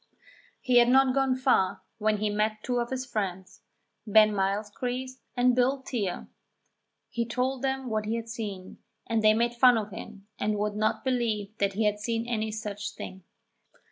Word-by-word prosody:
He 250 -2 +4
had 240 0 +5
not 265 0 +5
gone 270 -1 +2
far 250 -8 +2 0.2
when 215 0 +2
he 210 0 -1
met 215 +1 -1
two 245 -1 0
of 235 0 -2
his 260 0 -3
friends, 190 -6 -4 0.5
Ben 215 0 +6
Mylechreest 230 +6 -2 0.2
and 245 0 +4
Bill 260 +2 +2
Teare. 205 -9 -3 0.8
He 235 - -1
told 250 +2 -1
them 265 -1 -1
what 215 -2 -1
he 220 +2 -1
had 230 0 -4
seen, 205 -5 -6 0.3
and 225 -1 0
they 215 0 +6
made 235 +1 +1
fun 245 0 +6
of 210 -1 -3
him 200 +1 -9
and 210 0 0
would 210 0 -1
not 215 +1 0
believe 220 -5 -1
that 200 -1 +1
he 215 +3 0
had 210 0 +1
seen 230 +2 -2
any 220 -2 -1
such 210 -1 -5
thing. 190 -1 -8
220 Hz, 175 wpm, -28 LUFS, 210-250 Hz, 0.8 s, Ben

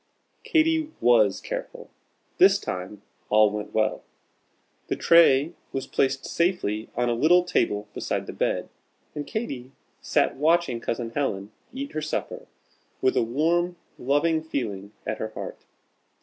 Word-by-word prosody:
Katy 320 -1 +2
was 110 -5 +4
careful. - - -7 0.5
This - - +7
time 95 +3 -6 0.3
all 105 0 +5
went 105 0 -5
well. 110 0 0 0.9
The - - -1
tray 165 -2 +5 0.2
was 135 - -3
placed 135 0 0
safely 170 - -1
on 120 0 +1
a 120 - +2
little 165 +9 +4
table 105 -11 0
beside - - -2
the - - -7
bed, - - -1 0.5
and 150 -1 -5
Katy 135 - -5 0.3
sat - - +1
watching 160 -4 +2
Cousin 115 0 -3
Helen 105 -7 -2 0.2
eat 280 +2 -6
her 155 - -3
supper 155 - -4 0.5
with 130 - +2
a - - +3
warm, 165 +9 +1 0.2
loving 145 +5 +2
feeling 105 -10 -4
at 110 - -3
her 110 - -3
heart. - - -7
135 Hz, 135 wpm, -25 LUFS, 110-170 Hz, 0.9 s, This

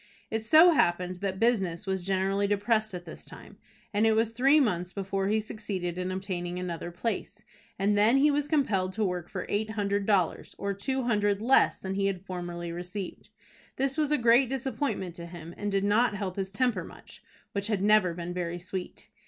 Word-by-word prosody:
It 220 0 -1
so 315 +10 +7
happened 180 - +1
that 190 0 -3
business 210 -6 +1
was 190 -2 -1
generally 195 +1 +1
depressed 215 0 +1
at 175 -1 -7
this 160 - -8
time, - - -12 0.3
and 205 +1 +2
it 220 - +4
was 225 0 +2
three 270 +6 +4
months 180 - 0
before 195 0 -2
he 215 +2 +2
succeeded 200 -5 -4
in 180 0 -3
obtaining 180 -2 -4
another 175 -2 -4
place, 200 +7 -4 0.3
and 205 +2 +2
then 215 +5 +4
he 295 +2 +5
was 290 0 0
compelled 200 - +1
to 215 +1 0
work 180 -2 -3
for - - -4
eight 215 +1 -1
hundred 200 -2 -1
dollars, 190 -6 +1
or 200 0 -2
two 260 +7 -2
hundred 205 -4 +1
less 250 +5 +4
than 190 0 -4
he 195 0 +1
had 195 -1 -3
formerly 175 -2 -5
received. 180 +3 -6 0.5
This 270 0 0
was 300 -2 +1
a 300 - +4
great 240 +1 +4
disappointment 265 -7 -2
to 170 0 -7
him, 170 -1 -9
and 205 0 -3
did 195 0 +1
not 210 +2 +3
help 195 -2 -4
his 195 -1 -2
temper 240 +4 0
much, - - -12 0.3
which 200 0 -1
had 205 -3 0
never 210 -5 +4
been 175 0 -5
very 175 -1 -3
sweet. 180 +1 -6
200 Hz, 195 wpm, -28 LUFS, 180-225 Hz, 0.5 s, so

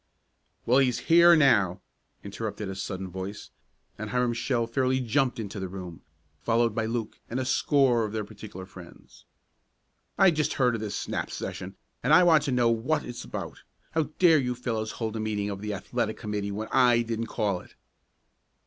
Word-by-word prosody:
"Well, 125 +3 +4
he's 125 -3 +2 0.2
here 170 0 +8
now!" 105 - +4 0.4
interrupted 105 0 -5
a 95 - -5
sudden 95 -1 -5
voice, 95 +3 -7 0.5
and 110 0 -5
Hiram 125 +1 +1
Shell 115 0 0
fairly 130 +2 0
jumped 125 +1 0
into 105 -1 -5
the 95 - -3
room, 90 -3 -8 0.4
followed 115 +2 +1
by 110 0 -1
Luke 115 -1 -4
and 120 - -2
a 130 - -2
score 130 -3 +3
of 105 - -3
their 110 0 -2
particular 100 -2 -10
friends. 90 -2 -15 0.9
"I 190 - +6
just 155 -2 0
heard 125 -3 +2
of 115 - -3
this 105 -2 -4
snap - - -3
session, 95 +1 -6 0.3
and 145 +5 +5
I 180 - +7
want 165 -4 +6
to 140 - -1
know 120 -2 +3
what 130 +7 0
it's 120 -1 -7
about. - - -7 0.3
How 160 -2 0
dare 165 -4 +6
you 125 -2 -1
fellows 115 -3 -3
hold 110 -1 -4
a - - -3
meeting 105 -1 -2
of 100 0 -6
the 105 -1 -3
athletic 110 +2 -3
committee 105 -2 -3
when 110 +2 -4
I 120 -2 +4
didn't 115 0 -3
call 105 -5 -1
it?" - - -17
115 Hz, 185 wpm, -27 LUFS, 105-125 Hz, 0.9 s, here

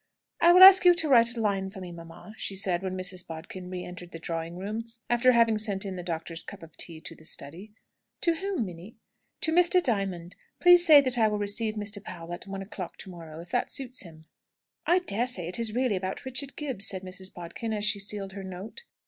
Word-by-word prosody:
"I 340 - +6
will 365 +1 +9
ask 385 0 +11
you 355 -1 +7
to 325 -2 +1
write 235 -3 +4
a - - -2
line 195 -3 0
for 190 - -10
me, 180 -2 -8
mamma," 170 +5 -11
she 200 - -3
said, 185 -2 0
when 185 -1 -4
Mrs. 185 -1 -4
Bodkin 175 +3 -8
re 180 -1 -5
entered 175 0 -9
the 165 - -8
drawing 165 +1 -5
room, 215 +4 -4 0.3
after 240 +1 +5
having 230 -2 +3
sent 205 -2 -2
in 190 -1 -4
the 180 - -5
doctor's 165 -1 -4
cup 200 0 -10
of 165 -1 -14
tea 165 -2 -6
to - - -8
the - - -17
study. 170 +7 -7 0.5
"To 335 - +4
whom, 375 - -2
Minnie?" 180 +4 -10 0.5
"To 320 - +3
Mr. 355 +2 +5
Diamond. 195 - -2 0.2
Please 355 0 +7
say 310 -5 +8
that 255 -3 +1
I 220 - +5
will 210 0 -1
receive 210 +2 -1
Mr. 205 -1 -5
Powell 170 -3 -8
at 175 - -8
one 195 0 -5
o'clock 190 -2 -8
to 190 - -8
morrow, 165 -2 -10
if 170 - -14
that - - 0
suits 255 -2 -3
him." 160 -3 -12 0.6
"I 350 - +5
daresay 240 - -2
it 180 +7 -1
is 225 -1 -1
really 250 -5 +1
about 185 +5 -5
Richard 265 +2 -4
Gibbs," 265 -9 -1
said 190 -2 -1
Mrs. 185 0 -5
Bodkin, 175 +6 -6
as 210 -1 -1
she 215 -1 +2
sealed 200 -1 -4
her 195 0 -8
note. 190 - -8
200 Hz, 225 wpm, -27 LUFS, 180-235 Hz, 0.6 s, ask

